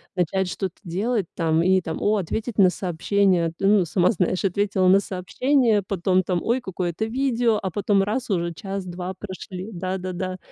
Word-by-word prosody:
начать 180 Hz, +1 st, 0 dB
что-то 190 Hz, -2 st, -4 dB
делать 200 Hz, +4 st, -1 dB
там 165 Hz, -1 st, +1 dB
и 185 Hz, 0 st, +4 dB
там, 160 Hz, -1 st, -4 dB
о, 210 Hz, +1 st, +2 dB
ответить 210 Hz, +5 st, -3 dB
на 185 Hz, -2 st, +7 dB
сообщение. 180 Hz, -1 st, +1 dB
Ну, 195 Hz, -1 st, +4 dB
сама 180 Hz, +4 st, +2 dB
знаешь, 185 Hz, -1 st, 0 dB
ответила 195 Hz, 0 st, +1 dB
на 190 Hz, +2 st, +6 dB
сообщение, 220 Hz, +5 st, +1 dB
потом 185 Hz, -1 st, +1 dB
там: 180 Hz, -1 st, -1 dB
ой, 245 Hz, +3 st, +1 dB
какое-то 180 Hz, +1 st, -3 dB
видео, 240 Hz, -2 st, +1 dB
а 190 Hz, -2 st, -3 dB
потом 200 Hz, +1 st, +2 dB
раз 225 Hz, +5 st, -2 dB
уже 170 Hz, -3 st, 0 dB
час-два 185 Hz, 0 st, -5 dB
прошли. 190 Hz, +1 st, -7 dB
Да-да-да. 185 Hz, 0 st, -4 dB
190 Hz, 160 wpm, -23 LUFS, 180-205 Hz, -, на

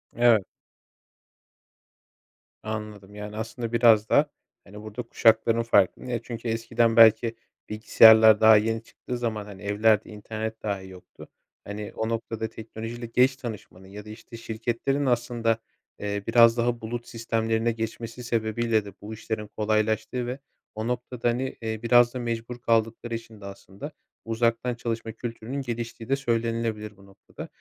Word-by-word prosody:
Evet. 115 Hz, -4 st, +4 dB, 2.2 s
Anladım 105 Hz, -2 st, -7 dB
yani 105 Hz, +1 st, -7 dB
aslında 115 Hz, +1 st, -5 dB
biraz 115 Hz, -2 st, +5 dB
da -, -, +4 dB, 0.3 s
hani 105 Hz, +2 st, -12 dB
burda 110 Hz, 0 st, -6 dB
kuşakların 115 Hz, +1 st, +3 dB
farkı. 100 Hz, -5 st, +2 dB
Niye 120 Hz, -2 st, -3 dB
çünkü 115 Hz, -1 st, -6 dB
eskiden 115 Hz, 0 st, +1 dB
belki 115 Hz, 0 st, +6 dB, 0.3 s
bilgisayarlar 110 Hz, 0 st, +7 dB
daha 110 Hz, 0 st, +8 dB
yeni 115 Hz, +2 st, -1 dB
çıktığı 125 Hz, +2 st, -7 dB
zaman 110 Hz, -3 st, -3 dB
hani 100 Hz, -2 st, -11 dB
evlerde 105 Hz, +1 st, +2 dB
internet 110 Hz, +1 st, -6 dB
dahi 100 Hz, -3 st, -3 dB
yoktu. 90 Hz, -1 st, -14 dB, 0.4 s
Hani 105 Hz, 0 st, -6 dB
o 110 Hz, 0 st, -2 dB
noktada 115 Hz, -1 st, -3 dB
teknolojiyle 115 Hz, +2 st, -7 dB
geç 125 Hz, +3 st, +3 dB
tanışmanın 110 Hz, -7 st, -9 dB
ya 105 Hz, +2 st, -10 dB
da -, -, -11 dB
işte 115 Hz, +2 st, -11 dB
şirketlerin 120 Hz, +5 st, -2 dB
aslında, 120 Hz, -2 st, +1 dB, 0.4 s
eee, 100 Hz, -1 st, -3 dB
biraz 115 Hz, -1 st, +6 dB
daha 120 Hz, 0 st, 0 dB
bulut 120 Hz, +2 st, -5 dB
sistemlerine 115 Hz, 0 st, -1 dB
geçmesi 115 Hz, +1 st, -6 dB
sebebiyle 115 Hz, -1 st, 0 dB
de 100 Hz, -, -10 dB
bu 105 Hz, +2 st, -7 dB
işlerin 110 Hz, -1 st, -5 dB
kolaylaştığı 110 Hz, +3 st, 0 dB
ve 125 Hz, +3 st, -4 dB, 0.4 s
o 110 Hz, +2 st, -3 dB
noktada 125 Hz, 0 st, -2 dB
hani, 130 Hz, +2 st, -2 dB
eee, 110 Hz, -1 st, -4 dB
biraz 120 Hz, 0 st, +5 dB
da 130 Hz, -, -4 dB
mecbur 120 Hz, 0 st, -4 dB
kaldıkları 115 Hz, +1 st, 0 dB
için 115 Hz, -2 st, -10 dB
de -, -, -10 dB
aslında 100 Hz, +7 st, -9 dB, 0.3 s
uzaktan 115 Hz, +2 st, 0 dB
çalışma 115 Hz, -1 st, -4 dB
kültürünün 115 Hz, +4 st, -6 dB
geliştiği 115 Hz, -2 st, -6 dB
de 135 Hz, -, +3 dB
söylenilebilir 115 Hz, -4 st, -2 dB
bu 100 Hz, -, -18 dB
noktada. 100 Hz, 0 st, -12 dB
115 Hz, 145 wpm, -26 LUFS, 110-120 Hz, 2.2 s, daha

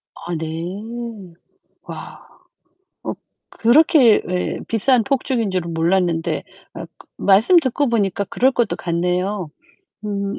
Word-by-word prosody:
아, 175 Hz, 0 st, -6 dB
네. 190 Hz, +5 st, -6 dB, 0.5 s
와. -, -, -9 dB, 0.8 s
어, -, -, -3 dB, 0.4 s
그렇게 250 Hz, -1 st, +5 dB
예 180 Hz, 0 st, -2 dB
비싼 230 Hz, +1 st, +2 dB
폭죽인 250 Hz, -5 st, -1 dB
줄은 170 Hz, -2 st, -2 dB
몰랐는데 170 Hz, 0 st, 0 dB, 0.3 s
아 -, -, -7 dB, 0.3 s
말씀 215 Hz, -, +4 dB
듣고 280 Hz, -2 st, +1 dB
보니까 200 Hz, -3 st, 0 dB
그럴 260 Hz, +7 st, +2 dB
것도 240 Hz, -4 st, 0 dB
같네요. 180 Hz, +1 st, -2 dB, 0.6 s
음. 200 Hz, -1 st, -3 dB
200 Hz, 200 characters per minute, -20 LUFS, 180-235 Hz, 0.8 s, 그렇게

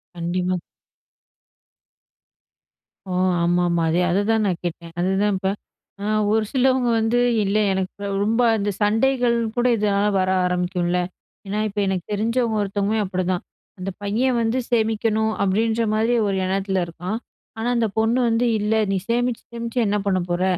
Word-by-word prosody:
கண்டிப்பா. 180 Hz, +1 st, -1 dB, 2.5 s
ஓ, -, -, -3 dB, 0.3 s
ஆமா, 175 Hz, +1 st, +2 dB
ஆமா, 170 Hz, -1 st, +1 dB
அதே 170 Hz, +3 st, +2 dB
அதுதான் 215 Hz, +3 st, +2 dB
நான் 180 Hz, -4 st, -1 dB
கேட்டேன். 170 Hz, -1 st, -5 dB
அதுதான் 195 Hz, +3 st, +1 dB
இப்ப. 190 Hz, 0 st, -1 dB, 0.5 s
அ, -, -, -5 dB, 0.3 s
ஒரு 220 Hz, 0 st, +3 dB
சிலவுங்க 260 Hz, -2 st, +2 dB
வந்து, 225 Hz, +2 st, +1 dB, 0.2 s
இல்லை 205 Hz, +2 st, +1 dB
எனக்கு 190 Hz, +1 st, -4 dB, 0.2 s
ரொம்ப 225 Hz, +3 st, +1 dB, 0.2 s
அந்த 205 Hz, 0 st, -1 dB
சண்டைகள் 235 Hz, +3 st, +2 dB, 0.2 s
கூட 245 Hz, -, +1 dB
இதனால 205 Hz, -1 st, +1 dB
வர 185 Hz, 0 st, +1 dB, 0.2 s
ஆரம்பிக்கும்ல. 180 Hz, 0 st, 0 dB, 0.5 s
ஏன்னா, 205 Hz, +2 st, -2 dB
இப்ப 205 Hz, 0 st, -4 dB
எனக்கு 185 Hz, -3 st, -2 dB
தெரிஞ்சவங்க 225 Hz, +2 st, 0 dB
ஒருத்தவங்களும் 205 Hz, +2 st, 0 dB
அப்பிடிதான். 185 Hz, -1 st, -2 dB, 0.4 s
அந்த 185 Hz, -, -3 dB
பையன் 235 Hz, +5 st, +1 dB
வந்து 225 Hz, +2 st, 0 dB
சேமிக்கணும் 220 Hz, -1 st, +1 dB
அப்பிடின்றமாரி 220 Hz, +3 st, +1 dB
ஒரு 195 Hz, -, 0 dB
எண்ணத்தில 190 Hz, 0 st, 0 dB
இருக்கான், 180 Hz, +6 st, -5 dB, 0.4 s
ஆனா 225 Hz, +2 st, -2 dB
அந்த 230 Hz, -1 st, +2 dB
பொண்ணு 225 Hz, +3 st, +2 dB
வந்து 230 Hz, +2 st, +2 dB
இல்ல, 210 Hz, +1 st, 0 dB, 0.2 s
நீ 195 Hz, -, +1 dB
சேமிச்சு, 240 Hz, 0 st, 0 dB
சேமிச்சு 235 Hz, +1 st, -3 dB
என்ன 205 Hz, +1 st, +1 dB
பண்ணப் 185 Hz, -3 st, 0 dB
போற? 175 Hz, +1 st, 0 dB
205 Hz, 140 wpm, -22 LUFS, 185-225 Hz, 2.5 s, ஒரு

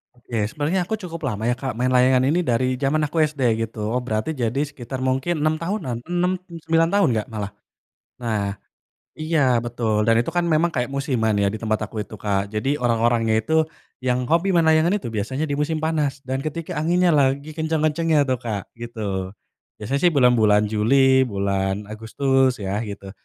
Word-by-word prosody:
Oke, 115 Hz, -4 st, -3 dB
sebenarnya 155 Hz, +7 st, -1 dB
aku 220 Hz, -, 0 dB
cukup 170 Hz, -5 st, -7 dB
lama 110 Hz, -1 st, -4 dB
ya, 120 Hz, -, +2 dB
Kak, 125 Hz, -2 st, -5 dB
main 125 Hz, +1 st, +1 dB
layangan 130 Hz, 0 st, +4 dB
ini 160 Hz, +6 st, +2 dB
dari 130 Hz, -3 st, +1 dB
jaman 150 Hz, +2 st, +1 dB
aku 160 Hz, +2 st, 0 dB
SD 150 Hz, -2 st, 0 dB, 0.2 s
gitu. 110 Hz, 0 st, -4 dB
Berarti 115 Hz, +5 st, -2 dB
jadi 125 Hz, -1 st, -1 dB
sekitar 130 Hz, -3 st, -7 dB
mungkin 135 Hz, +6 st, 0 dB
6 155 Hz, +1 st, 0 dB
tahunan, 165 Hz, -, -3 dB
6 175 Hz, +1 st, +1 dB
mmm, 170 Hz, -3 st, -12 dB
9 165 Hz, 0 st, +3 dB
tahun 200 Hz, -1 st, +3 dB
enggak 110 Hz, -2 st, -2 dB
malah. 105 Hz, -3 st, -5 dB, 0.7 s
Nah, 105 Hz, -4 st, -2 dB, 0.6 s
iya 145 Hz, -7 st, +1 dB
betul. 115 Hz, -3 st, -1 dB
Dan 115 Hz, -, +5 dB
itu -, -, -4 dB
kan 175 Hz, -, +2 dB
memang 165 Hz, +2 st, +2 dB
kayak 125 Hz, -3 st, -1 dB
musiman 130 Hz, -6 st, 0 dB
ya 100 Hz, 0 st, +1 dB
di 110 Hz, -, -6 dB
tempat 110 Hz, -1 st, -1 dB
aku 105 Hz, +1 st, -5 dB
itu, 100 Hz, -, -9 dB
Kak. 100 Hz, -1 st, -1 dB
Jadi 135 Hz, +7 st, -1 dB
orang-orangnya 115 Hz, -1 st, +2 dB
itu 160 Hz, +9 st, +2 dB, 0.4 s
yang 125 Hz, 0 st, 0 dB
hobi 170 Hz, +8 st, +2 dB
main 170 Hz, -2 st, +4 dB
layangan 160 Hz, +3 st, +4 dB
itu 195 Hz, -, -7 dB
biasanya 130 Hz, +8 st, -2 dB
di 145 Hz, -, -3 dB
musim 150 Hz, +2 st, 0 dB
panas 150 Hz, -3 st, 0 dB
dan 130 Hz, +1 st, -2 dB
ketika 165 Hz, +3 st, -4 dB
anginnya 175 Hz, +4 st, +2 dB
lagi 140 Hz, +1 st, +1 dB
kencang 160 Hz, 0 st, 0 dB
kencangnya 155 Hz, -1 st, +2 dB
tuh, 130 Hz, -2 st, 0 dB
Kak, 105 Hz, -4 st, -5 dB
gitu. 105 Hz, -5 st, -4 dB, 0.5 s
Biasanya 130 Hz, +6 st, -2 dB
sih -, -, -5 dB
bulan 125 Hz, -3 st, +5 dB
bulan 105 Hz, -2 st, +4 dB
Juli, 130 Hz, +5 st, +4 dB
bulan 100 Hz, 0 st, -1 dB
Agustus 130 Hz, +5 st, 0 dB
ya 100 Hz, +1 st, -2 dB
gitu. 100 Hz, -3 st, -7 dB
130 Hz, 185 wpm, -22 LUFS, 110-155 Hz, 0.7 s, Dan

